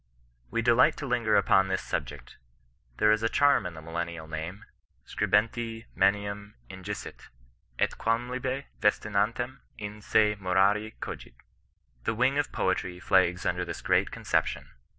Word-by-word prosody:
'^ - - -34
We 115 - -1
delight 120 +2 +4
to 145 - -5
linger 120 -4 +1
upon 95 -1 +4
this 95 0 -1
subjeet 70 -4 -5 0.6
There 105 - +4
is 110 0 +2
a 115 - +1
charm 140 -9 +3
in 85 - -8
the 80 - -10
millennial 85 0 -5
name, 80 +5 -6 0.4
'Scribentimanuminjicit, 105 - -2 0.5
et - - +2
quamlibet 125 +4 -1 0.2
festinantem 105 +5 0 0.2
in 105 0 -7
se 105 -1 +3
morari 100 +4 +2
oogit.' - - -7 0.7
The 110 - 0
wing 130 +5 +2
of 145 - -1
poetnr 95 -1 -1
flags 90 -1 +2
under 90 0 0
this 90 - -6
great - - +2
conception. - - -1
105 Hz, 130 wpm, -28 LUFS, 90-115 Hz, 0.7 s, delight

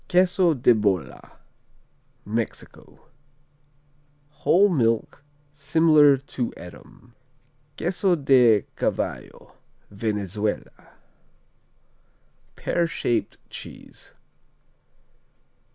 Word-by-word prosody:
Queso 180 -2 +3
de 125 -1 +4
Bola 100 -6 -2 0.9
Mexico 110 +2 -6 1.3
Whole 190 +6 +3
milk, 120 - -1 0.3
similar 150 -1 +4
to 130 -2 -5
Edam. 115 +7 -14 0.6
Queso 180 +1 0
de 125 - +4
Cavallo - - -4 0.4
Venezuela 105 0 -4 1.6
Pear 170 -1 -1
shaped 120 -7 -2
cheese. - - -11
130 Hz, 60 wpm, -24 LUFS, 110-165 Hz, 1.6 s, de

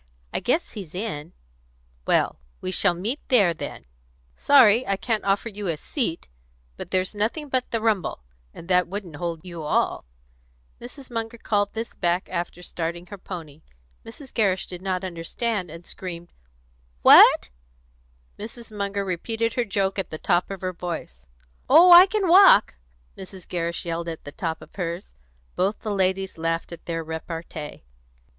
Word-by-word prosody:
I - - 0
guess 315 +8 0
he's 185 -7 -9
in." 180 -6 -5 0.7
"Well, - - +2 0.2
we 185 - -4
shall 185 -1 +2
meet 220 - -2
there, 205 -9 +4
then. 155 - -7 0.5
Sorry 250 -5 +6
I 195 - +1
can't 220 +1 -1
offer 200 +3 +1
you 205 -2 -5
a 165 -3 -1
seat. 195 - -2 0.5
But - - -8
there's 185 +1 0
nothing 230 +9 -2
but 255 -1 0
the 230 - -1
rumble, 210 - 0 0.3
and 170 - -12
that 180 -1 +3
wouldn't 185 -5 -6
hold 170 0 -4
you 170 -2 -7
all." 150 - 0 0.8
Mrs. 255 +2 -11
Munger 230 0 -4
called 205 -2 0
this 225 +1 -5
back 175 0 0
after 175 0 -4
starting 170 0 -4
her 200 - -7
pony. 160 -5 -9 0.4
Mrs. 265 +3 -12
Gerrish 195 -5 +1
did 180 -1 -9
not 185 -1 -2
understand, 185 +3 -3
and 165 +2 -11
screamed, 175 -2 -8 0.7
"What?" - - +8 0.9
Mrs. 225 0 -9
Munger 200 0 -2
repeated 225 +5 -2
her 245 - 0
joke 195 -1 -1
at 190 - -3
the 155 - -6
top 175 +3 +1
of 195 -2 -6
her 185 -1 -3
voice. 160 - -7 0.4
"Oh, 360 +2 +8
I 355 +2 +11
can 400 -1 0
walk!" 360 - +7 0.4
Mrs. 190 -1 -11
Gerrish 170 -1 -3
yelled 170 0 -3
at 165 - -7
the 145 - -8
top 165 +1 -4
of - - -17
hers. 175 0 -5 0.4
Both 195 +3 0
the 215 -2 -3
ladies 190 -2 -1
laughed 165 +1 -2
at 170 - -11
their 165 -1 -2
repartee. 160 - -7
190 Hz, 160 wpm, -24 LUFS, 170-220 Hz, 0.9 s, I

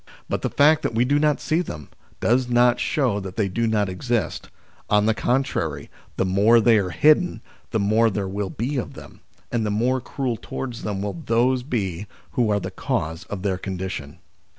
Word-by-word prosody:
But - - -2
the - - -1
fact 155 +2 +4
that 115 - -2
we 120 +2 +3
do 145 +3 +2
not 150 -1 +2
see 160 +3 0
them, 75 - -7 0.3
does 125 +2 +2
not 120 0 +4
show 125 -9 +1
that 95 -2 -7
they 105 -3 +1
do 115 +5 -1
not 105 -2 +1
exist; 105 +1 -2 0.4
on 105 0 +4
the 110 - +3
contrary, 110 - -1 0.3
the - - +1
more 100 +5 +5
they 115 -1 +5
are 95 -2 -1
hidden 155 - +3 0.3
the 110 - 0
more 110 +3 +3
there 100 -2 -2
will 100 0 -3
be 130 +9 -3
of 125 - -4
them, - - -12 0.3
and 120 -2 0
the 105 - -1
more 120 +5 +1
cruel 130 -2 -3
towards 125 -1 -6
them 100 -2 -3
will 100 -5 -4
those 125 +3 +2
be 105 - -3 0.2
who 120 -3 +1
are 105 -1 +2
the - - -5
cause 80 +2 -3
of 100 -2 -6
their 95 -3 -1
condition. 95 -6 -5
110 Hz, 195 wpm, -23 LUFS, 95-125 Hz, 0.4 s, more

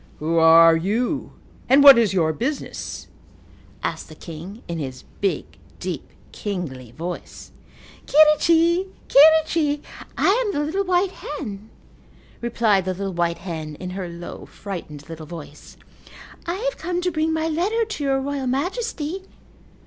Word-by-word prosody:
"Who 165 +2 0
are 165 0 +8
you 225 - -1 0.4
and 275 +2 +6
what 275 -4 +10
is 225 -4 +3
your 165 -5 +1
business?" 270 - -4 0.8
asked - - -3
the - - -11
king 175 +7 -9
in 170 -1 -4
his 130 -3 -6 0.2
big, 200 -2 0 0.3
deep, - - -5 0.2
kingly 160 - -5
voice. 170 +7 -7 0.6
"Quirrichi, 330 +4 +4 0.2
quirrichi, 310 0 +5 0.3
I - - +2 0.2
am 415 -4 -2
the 290 - -1
little 385 +6 -1
white 365 +1 +2
hen," 220 - -7 0.7
replied 225 -5 +2
the 185 -1 -2
little 195 0 -4
white 170 0 0
hen 155 -4 -5
in 180 +3 -7
her 185 -1 -5
low, 170 0 -9
frightened, 160 -7 -8
little 160 -1 -9
voice. 155 -3 -11 0.7
"I 345 - -1
have - - -2
come 350 +2 -2
to 360 0 0
bring 315 0 0
my 320 0 0
letter 390 +9 0
to 430 -9 -5
your 270 -1 +1
royal 275 -1 -3
majesty." 355 - -2
235 Hz, 140 wpm, -22 LUFS, -, 0.8 s, what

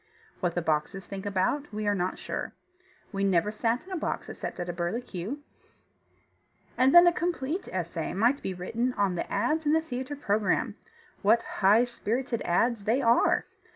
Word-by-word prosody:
What 175 -3 -1
the 175 - 0
boxes 160 +5 -1
think 195 0 -6
about 205 +9 0
we 215 0 -3
are 205 - +3
not 185 -2 -1
sure. - - -5 0.6
We 195 -1 -2
never 195 +1 +2
sat 230 +5 -1
in 385 - -13
a - - -2
box 330 - -3
except - - -6
at 175 - -3
a 175 - -3
burlicue. 190 +5 -3 1.4
And 260 +1 +4
then 345 0 +10
a 345 - +5
complete 340 0 -2
essay 170 -3 -3
might 240 +8 +2
be 190 - -3
written 230 +8 -2
on 200 -4 +1
the 175 - -4
ads 305 +11 +1
in 295 - +4
the 320 - +5
theatre 260 -2 -5
program 210 -7 0 0.5
what 225 +3 +4 0.2
high 205 +5 +6
spirited 245 0 -2
ads 210 +4 +1
they 230 +5 +2
are! 235 -3 +3
215 Hz, 175 wpm, -28 LUFS, 190-255 Hz, 1.4 s, then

